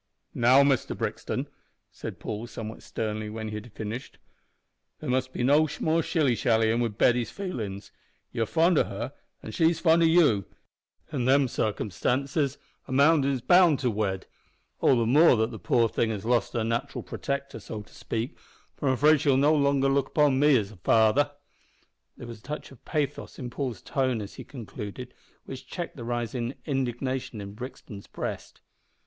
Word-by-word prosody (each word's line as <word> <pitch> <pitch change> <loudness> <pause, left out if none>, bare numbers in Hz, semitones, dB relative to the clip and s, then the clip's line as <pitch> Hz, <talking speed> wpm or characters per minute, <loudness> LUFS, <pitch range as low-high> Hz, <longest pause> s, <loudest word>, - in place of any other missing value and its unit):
"Now, 130 +4 +5
Mister 140 -3 +1
Brixton," - - -3 0.4
said - - -8
Paul, 110 +3 -5
somewhat 110 -2 -7
sternly, 110 -1 -4
when 110 0 -5
he - - -7
had 105 +2 -7
finished, 110 +5 -6 0.8
"there - - -3
must 130 0 0
be 120 - -3
no 145 +5 +4
more 160 +1 +2
shilly 155 -7 +1
shallyin' 115 -1 +2
wi' 120 - +2
Betty's 115 +2 +2
feelin's. 110 - -5 0.4
You're 115 -1 -1
fond 170 - +3
o' - - +4
her, - - -5 0.3
an' 110 - -7
she's 165 +7 +2
fond 165 -1 +4
o' - - +5
you. 155 - +4 0.7
In 130 -4 -1
them 135 +1 +4
circumstances 130 - -1 0.3
a - - -8
man 140 +3 +5
is 135 -2 0
bound 175 0 +5
to 125 -3 +1
wed 100 -3 -2 0.5
all 135 - +4
the 115 - +2
more 140 +3 +6
that 110 +2 +1
the 110 - -8
poor 115 +6 +2
thing 110 +1 0
has 105 -2 -4
lost 120 0 +1
her 115 - 0
nat'ral 115 +5 -2
protector, 140 -4 -4
so 105 0 -7
to - - -21
speak, 115 +6 -4 0.4
for 145 - -3
I'm 130 - +3
afraid 150 +2 +4
she'll 140 -3 +3
no 145 +3 +4
longer 140 -2 +3
look 135 0 +2
upon 145 -3 +3
me 145 -2 +5
as 105 -2 -2
a 105 - -14
father." 110 - +3 0.9
There - - -9
was 115 -2 -9
a - - -25
touch 150 +5 -7
of 135 - -16
pathos 150 -4 -3
in 125 -2 -6
Paul's 125 -7 -4
tone 130 -4 0
as 100 -1 -7
he - - -9
concluded, 120 0 -8 0.3
which 130 - -9
checked 175 -2 -5
the 120 - -8
rising 120 +1 -3
indignation 130 -3 -2
in 100 -1 -7
Brixton's 110 -3 -9
breast. - - -6
125 Hz, 180 wpm, -27 LUFS, 110-140 Hz, 0.9 s, more